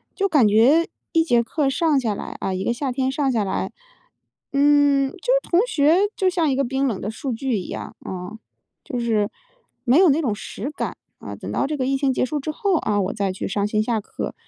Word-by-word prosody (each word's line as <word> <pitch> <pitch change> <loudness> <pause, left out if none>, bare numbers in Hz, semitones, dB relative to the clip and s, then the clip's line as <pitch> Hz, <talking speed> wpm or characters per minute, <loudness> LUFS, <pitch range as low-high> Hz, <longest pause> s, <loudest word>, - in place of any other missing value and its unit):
就 395 0 0
感 280 - +5
觉 255 +11 +5 0.2
一 330 - +4
节 240 -6 +3
课 280 +3 0
上 295 +1 +2
下 220 -5 -1
来， - - -7
啊 190 - -2
一 185 +1 -2
个 235 - 0
夏 255 +1 -2
天 265 0 0
上 275 0 0
下 230 -5 +1
来， 195 - -3 0.8
嗯， 280 -1 +4
就 - - -13
是 - - 0
同 345 - +4
学 305 -2 +3 0.2
就 380 - +2
像 335 -4 +1
一 265 - +1
个 275 - +1
冰 270 +2 0
冷 210 -6 -2
的 210 - -3
数 255 +2 -4
据 245 -1 -1
一 - - -7
样， - - -6
嗯， 185 +4 -6 0.5
就 250 - -4
是 220 -3 +1 0.5
没 255 +4 +4
有 365 -3 +6
那 300 +4 +3
种 235 -8 0
实 230 +6 -6
感。 - - -4 0.2
啊， - - -7
等 - - -7
到 275 - 0
这 305 - -2
个 260 -3 -1
疫 270 +1 +1
情 270 -1 +1
结 - - 0
束 295 +4 -1
之 290 - -5
后， 385 +5 0
啊， 210 -8 0
我 190 +1 -2
再 200 -3 -1
去 - - -5
上 200 +1 -1
线 215 0 +1
下 225 -1 0
课， - - -6
265 Hz, 255 characters per minute, -22 LUFS, 220-295 Hz, 0.8 s, 有